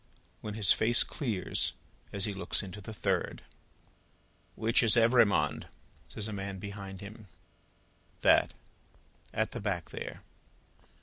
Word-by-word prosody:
when 105 Hz, -1 st, -5 dB
his 105 Hz, -5 st, +5 dB
face 115 Hz, +1 st, +3 dB
clears, 110 Hz, -, -1 dB, 0.4 s
as 100 Hz, -1 st, +1 dB
he 105 Hz, -, -1 dB
looks 100 Hz, +2 st, -1 dB
into 100 Hz, +2 st, -8 dB
the 110 Hz, -, -7 dB
third. 110 Hz, -, -1 dB, 1.1 s
"Which 115 Hz, +1 st, +3 dB
is 115 Hz, -1 st, +5 dB
Evrémonde?" 115 Hz, -, +4 dB, 0.4 s
says 105 Hz, -, -2 dB
a 110 Hz, -, -5 dB
man 100 Hz, -1 st, -4 dB
behind 100 Hz, -1 st, -7 dB
him. 105 Hz, +1 st, -10 dB, 0.9 s
"That. -, -, +5 dB, 0.8 s
At 110 Hz, 0 st, 0 dB
the 125 Hz, -, -5 dB
back 95 Hz, -6 st, -3 dB
there." -, -, -6 dB
105 Hz, 125 wpm, -31 LUFS, 100-110 Hz, 1.1 s, his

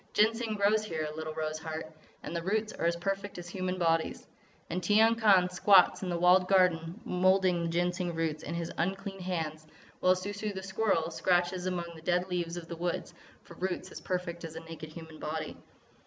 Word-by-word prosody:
"Ginseng 225 Hz, +1 st, +2 dB
grows 210 Hz, +1 st, +3 dB
here, 160 Hz, -6 st, -3 dB
little 155 Hz, 0 st, -5 dB
Rose 155 Hz, 0 st, -2 dB
Heart, 160 Hz, 0 st, -6 dB, 0.3 s
and 170 Hz, -, -5 dB
the 170 Hz, -, -1 dB
roots 215 Hz, +4 st, -1 dB
are 170 Hz, -, -1 dB
as 170 Hz, -, +2 dB
perfect 195 Hz, +3 st, -3 dB
as 175 Hz, 0 st, -7 dB
human 185 Hz, 0 st, -3 dB
bodies. 165 Hz, -2 st, 0 dB, 0.5 s
And 180 Hz, +2 st, -1 dB
Tiyang 215 Hz, +5 st, +5 dB
Khan 200 Hz, -5 st, +5 dB
squats 185 Hz, 0 st, +5 dB
in 185 Hz, -, -3 dB
the 175 Hz, -, 0 dB
walled 180 Hz, +1 st, +5 dB
garden 180 Hz, -1 st, +3 dB
moulding 185 Hz, -2 st, +3 dB
the 170 Hz, -, -1 dB
Ginseng 175 Hz, +1 st, -1 dB
roots 160 Hz, -2 st, -1 dB
in 165 Hz, -, -5 dB
his 170 Hz, -1 st, -3 dB
unclean 195 Hz, +3 st, -2 dB
hands, 160 Hz, -4 st, -3 dB, 0.3 s
while 185 Hz, 0 st, +4 dB
Sou 190 Hz, +3 st, -4 dB
Sou 210 Hz, +1 st, -3 dB
the 190 Hz, -1 st, -6 dB
Squirrel 190 Hz, -4 st, 0 dB
scratches 180 Hz, 0 st, +1 dB
among 180 Hz, -2 st, -1 dB
the 160 Hz, -, -11 dB
dead 180 Hz, +2 st, +1 dB
leaves 175 Hz, -1 st, -2 dB
of 170 Hz, -2 st, -7 dB
the 170 Hz, -, -6 dB
woods 175 Hz, +1 st, -3 dB, 0.3 s
for -, -, -13 dB
roots 185 Hz, 0 st, -3 dB
as -, -, -8 dB
perfect 180 Hz, -2 st, -3 dB
as 160 Hz, -1 st, -7 dB
a 165 Hz, -, -6 dB
naked 165 Hz, -1 st, -9 dB
human 160 Hz, -1 st, -10 dB
body. 155 Hz, +1 st, -4 dB
180 Hz, 200 wpm, -30 LUFS, 165-190 Hz, 0.5 s, Tiyang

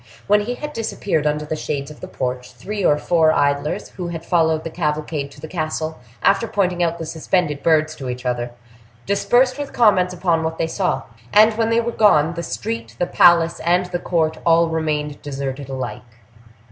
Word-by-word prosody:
When 210 Hz, +1 st, +4 dB
he 240 Hz, +4 st, -3 dB
had 295 Hz, +3 st, -6 dB
disappeared 200 Hz, -, -1 dB
under 150 Hz, 0 st, -1 dB
the 155 Hz, -, -3 dB
shades 145 Hz, -1 st, -4 dB
of 150 Hz, -, -13 dB
the -, -, -6 dB
porch, 125 Hz, 0 st, -4 dB
three 200 Hz, -, -5 dB
or 150 Hz, -4 st, +4 dB
four 160 Hz, 0 st, +3 dB
idlers, 145 Hz, 0 st, 0 dB
who 180 Hz, -2 st, -6 dB
had 165 Hz, -1 st, -6 dB
followed 160 Hz, -3 st, +2 dB
the 165 Hz, -, -5 dB
cavalcade 150 Hz, -3 st, -2 dB
to -, -, -16 dB
the 160 Hz, -, -7 dB
castle, 155 Hz, -1 st, -3 dB, 0.2 s
after 215 Hz, +4 st, +3 dB
pointing 185 Hz, -4 st, 0 dB
out 170 Hz, -1 st, +1 dB
the 165 Hz, -, -5 dB
suspended 160 Hz, -2 st, -1 dB
birds 155 Hz, -1 st, +2 dB
to 130 Hz, -2 st, -5 dB
each 125 Hz, +1 st, -6 dB
other, 120 Hz, -1 st, -1 dB, 0.6 s
dispersed 250 Hz, +6 st, +2 dB
with 285 Hz, -, -5 dB
comments 195 Hz, -6 st, +4 dB
upon 175 Hz, -2 st, 0 dB
what 160 Hz, 0 st, -3 dB
they -, -, 0 dB
saw: 160 Hz, -, -1 dB, 0.3 s
and, 215 Hz, +1 st, +6 dB
when 225 Hz, +1 st, 0 dB
they 230 Hz, 0 st, +3 dB
were 235 Hz, +1 st, -2 dB
gone, 170 Hz, -8 st, +4 dB
the 170 Hz, -, -4 dB
street, 115 Hz, -2 st, -5 dB
the -, -, +1 dB
palace, 170 Hz, -1 st, +4 dB
and 175 Hz, +2 st, +2 dB
the 175 Hz, -, -1 dB
court, 160 Hz, -3 st, 0 dB
all 165 Hz, 0 st, +4 dB
remained 150 Hz, -2 st, -2 dB
deserted 135 Hz, -1 st, -5 dB
alike. 130 Hz, -2 st, -5 dB
160 Hz, 195 wpm, -20 LUFS, 150-180 Hz, 0.6 s, and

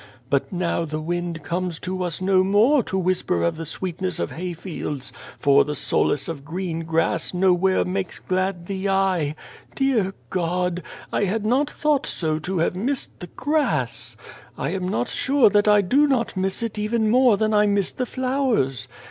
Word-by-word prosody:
But 140 Hz, -1 st, +1 dB
now 175 Hz, -2 st, -1 dB
the 155 Hz, -1 st, -4 dB
wind 170 Hz, 0 st, -3 dB
comes 175 Hz, -1 st, -2 dB
to 185 Hz, 0 st, -3 dB
us 175 Hz, -1 st, -3 dB
no 185 Hz, 0 st, +3 dB
more 220 Hz, +9 st, +4 dB
to 190 Hz, -, -2 dB
whisper 180 Hz, -, 0 dB
of 85 Hz, -, +1 dB
the 165 Hz, 0 st, -6 dB
sweetness 180 Hz, +1 st, -3 dB
of -, -, -2 dB
hayfields, 165 Hz, -5 st, -5 dB, 0.2 s
for 140 Hz, -1 st, +5 dB
the 150 Hz, -, -4 dB
solace 145 Hz, -, +1 dB
of 155 Hz, -4 st, -5 dB
green 165 Hz, 0 st, -4 dB
grass 165 Hz, +1 st, 0 dB
nowhere 185 Hz, +1 st, +3 dB
makes 190 Hz, 0 st, -3 dB
glad 185 Hz, -1 st, -2 dB
the 195 Hz, +1 st, -3 dB
eye. 185 Hz, -6 st, +1 dB, 0.4 s
Dear 235 Hz, -9 st, +1 dB, 0.2 s
God! 180 Hz, 0 st, -1 dB, 0.3 s
I 205 Hz, -, +2 dB
had 210 Hz, +2 st, -1 dB
not 265 Hz, +6 st, +2 dB
thought 300 Hz, -3 st, 0 dB
so 155 Hz, -2 st, -1 dB
to 185 Hz, +4 st, -3 dB
have 170 Hz, +2 st, +1 dB
missed 250 Hz, +8 st, -2 dB
the 180 Hz, -, -7 dB
grass. 175 Hz, -, -1 dB, 0.4 s
I -, -, -2 dB
am 185 Hz, 0 st, -2 dB
not 120 Hz, -7 st, -1 dB
sure 270 Hz, -6 st, +3 dB
that 205 Hz, 0 st, +3 dB
I 210 Hz, -1 st, +6 dB
do 275 Hz, +10 st, +3 dB
not 250 Hz, -7 st, 0 dB
miss 190 Hz, +3 st, 0 dB
it 225 Hz, -2 st, -3 dB
even 215 Hz, +1 st, +1 dB
more 250 Hz, -3 st, +5 dB
than 220 Hz, 0 st, +1 dB
I 210 Hz, 0 st, +4 dB
miss 200 Hz, -2 st, +1 dB
the 250 Hz, -, -3 dB
flowers. 255 Hz, -, 0 dB
185 Hz, 175 wpm, -23 LUFS, 170-210 Hz, 0.4 s, I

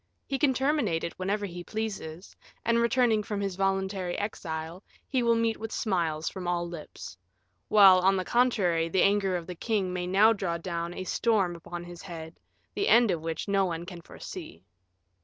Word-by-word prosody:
He 270 Hz, -1 st, -2 dB
can 265 Hz, -2 st, +3 dB
terminate 270 Hz, -, +1 dB
it 170 Hz, -, -3 dB
whenever 205 Hz, +2 st, -1 dB
he 175 Hz, -2 st, -7 dB
pleases, 195 Hz, -5 st, -5 dB, 0.3 s
and 235 Hz, 0 st, +3 dB
returning 235 Hz, -2 st, +3 dB
from 205 Hz, 0 st, -4 dB
his 195 Hz, -2 st, -2 dB
voluntary 190 Hz, -1 st, -1 dB
exile, 165 Hz, -4 st, -4 dB, 0.3 s
he 260 Hz, -2 st, 0 dB
will 235 Hz, -1 st, +3 dB
meet 230 Hz, -1 st, +1 dB
with 225 Hz, 0 st, -6 dB
smiles 165 Hz, -6 st, -1 dB
from 185 Hz, -2 st, -4 dB
all 175 Hz, -1 st, 0 dB
lips; 170 Hz, -3 st, -9 dB, 0.5 s
while, 195 Hz, -3 st, +8 dB
on 190 Hz, +2 st, +4 dB
the 185 Hz, -, -2 dB
contrary, 190 Hz, -10 st, +2 dB
the 180 Hz, +2 st, +3 dB
anger 195 Hz, -2 st, +2 dB
of 170 Hz, -, -7 dB
the 180 Hz, -, -6 dB
king 190 Hz, 0 st, -1 dB
may 180 Hz, -1 st, -2 dB
now 205 Hz, +5 st, +5 dB
draw 180 Hz, -5 st, -2 dB
down 170 Hz, 0 st, -4 dB
a 185 Hz, -, -4 dB
storm 195 Hz, -3 st, +1 dB
upon 175 Hz, +1 st, -7 dB
his 175 Hz, -1 st, -10 dB
head, 165 Hz, -3 st, -9 dB, 0.3 s
the 405 Hz, -, -1 dB
end 235 Hz, -3 st, +6 dB
of 170 Hz, -3 st, -2 dB
which 165 Hz, +2 st, -4 dB
no 195 Hz, -1 st, +2 dB
one 170 Hz, -1 st, -4 dB
can 175 Hz, -1 st, -9 dB
foresee." 85 Hz, -, -9 dB
190 Hz, 185 wpm, -28 LUFS, 170-215 Hz, 0.5 s, while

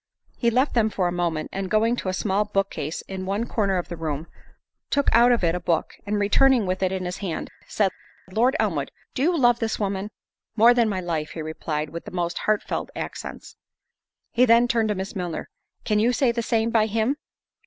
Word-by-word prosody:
He 235 Hz, -, +2 dB
left 255 Hz, +5 st, +2 dB
them 225 Hz, -3 st, +3 dB
for 185 Hz, -4 st, 0 dB
a -, -, -1 dB
moment, 170 Hz, -3 st, -2 dB
and 195 Hz, -1 st, -3 dB
going 225 Hz, +3 st, +3 dB
to 190 Hz, -, -3 dB
a -, -, -1 dB
small 195 Hz, +2 st, +1 dB
bookcase 195 Hz, -7 st, -2 dB
in 190 Hz, -1 st, -6 dB
one 200 Hz, +4 st, -1 dB
corner 200 Hz, -5 st, 0 dB
of 175 Hz, -, -3 dB
the 175 Hz, -, -6 dB
room, 155 Hz, -2 st, -3 dB, 0.6 s
took 285 Hz, -1 st, +2 dB
out 240 Hz, +1 st, +6 dB
of 235 Hz, -5 st, +2 dB
it 165 Hz, -1 st, +3 dB
a 180 Hz, -, -1 dB
book, 170 Hz, -2 st, 0 dB
and 210 Hz, +1 st, 0 dB
returning 235 Hz, +3 st, +4 dB
with 185 Hz, +1 st, -2 dB
it 185 Hz, -1 st, +1 dB
in 190 Hz, -1 st, -3 dB
his 180 Hz, +1 st, -4 dB
hand, 185 Hz, -6 st, -4 dB, 0.2 s
said, 200 Hz, -3 st, +1 dB, 0.4 s
"Lord 240 Hz, +6 st, +2 dB
Elmwood, 160 Hz, -11 st, 0 dB, 0.2 s
do -, -, -3 dB
you 340 Hz, +4 st, +3 dB
love 240 Hz, -4 st, +4 dB
this 225 Hz, -1 st, -1 dB
woman?" 200 Hz, 0 st, -2 dB, 0.5 s
"More 230 Hz, +2 st, +7 dB
than 235 Hz, -2 st, +3 dB
my 190 Hz, -3 st, -2 dB
life." 160 Hz, -3 st, -3 dB
He 160 Hz, -, -5 dB
replied, 155 Hz, -1 st, -3 dB
with 170 Hz, +1 st, -7 dB
the -, -, -6 dB
most 175 Hz, -1 st, -2 dB
heartfelt 215 Hz, -1 st, -1 dB
accents. -, -, -7 dB, 0.7 s
He 245 Hz, -, +3 dB
then 235 Hz, 0 st, +5 dB
turned 230 Hz, -3 st, +1 dB
to 210 Hz, -, 0 dB
Miss 190 Hz, +3 st, -5 dB
Milner—"Can 180 Hz, +3 st, -4 dB
you 235 Hz, +3 st, +3 dB
say 250 Hz, -1 st, +3 dB
the 235 Hz, 0 st, -2 dB
same 230 Hz, 0 st, +1 dB
by 220 Hz, -1 st, +3 dB
him?" 225 Hz, +6 st, 0 dB
205 Hz, 210 wpm, -24 LUFS, 180-230 Hz, 0.7 s, More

